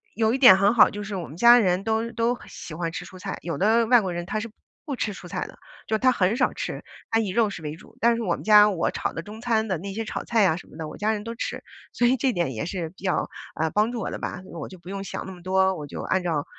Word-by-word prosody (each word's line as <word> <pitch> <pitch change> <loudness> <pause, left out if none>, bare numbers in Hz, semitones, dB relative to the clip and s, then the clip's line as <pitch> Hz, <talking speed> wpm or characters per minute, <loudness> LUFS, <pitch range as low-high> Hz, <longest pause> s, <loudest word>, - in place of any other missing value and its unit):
有 220 +1 +2
一 - - +1
点 220 -8 +9
很 200 +3 +4
好， 230 - +7
就 205 - -6
是 200 0 -5
我 175 -3 -4
们 155 - -11
家 240 +2 +8
人 185 -2 +1
都 225 +1 -1
都 235 +2 0
喜 160 - -9
欢 165 0 -3
吃 - - -6
蔬 185 - -12
菜， 195 +1 -5
有 170 - -4
的 225 +4 +3
外 245 -2 +6
国 185 -2 -3
人 175 0 -4
他 215 - -2
是 230 -1 -7 0.3
不 280 -3 -3
吃 210 - -2
蔬 180 -2 -11
菜 - - -3
的， - - -14 0.3
就 220 - -3
是 - - 0
他 255 0 +4
很 200 -1 +1
少 255 - +1
吃， - - -5 0.3
他 225 - +2
以 210 -4 -1
肉 220 +2 +2
食 175 - -7
为 150 0 -5
主。 - - -17
但 235 0 +4
是 - - -3
我 180 -6 0
们 - - -10
家 210 -1 +7
我 175 -4 0
炒 - - -3
的 165 - -4
中 210 +5 -10
餐 225 -3 0
的 185 - 0
那 195 +4 -6
些 225 +2 -3
炒 - - -5
菜 230 -2 +2
呀 170 -4 +3
什 - - -11
么 - - -16
的， 155 -2 -5
我 - - -10
家 215 +1 +1
人 210 -1 -4
都 230 0 -5
吃， - - -4 0.3
所 240 - +1
以 255 +2 +4
这 260 -2 +1
点 170 -6 -1
也 110 - -3
是 175 -3 -4
比 190 +3 -19
较， 185 - 0 0.3
呃， 160 0 0
帮 215 +4 +1
助 230 - -3
我 - - -3
的 - - -5
吧， - - -5
因 - - -13
为 170 - -9
我 - - -5
就 185 - -11
不 175 +2 -13
用 195 0 -4
想 - - -5
那 190 - -7
么 180 -1 -12
多， 190 +1 +2
我 150 -3 -7
就 - - -6
按 185 0 0
照 160 -5 -1
200 Hz, 340 characters per minute, -25 LUFS, 180-225 Hz, 0.3 s, 点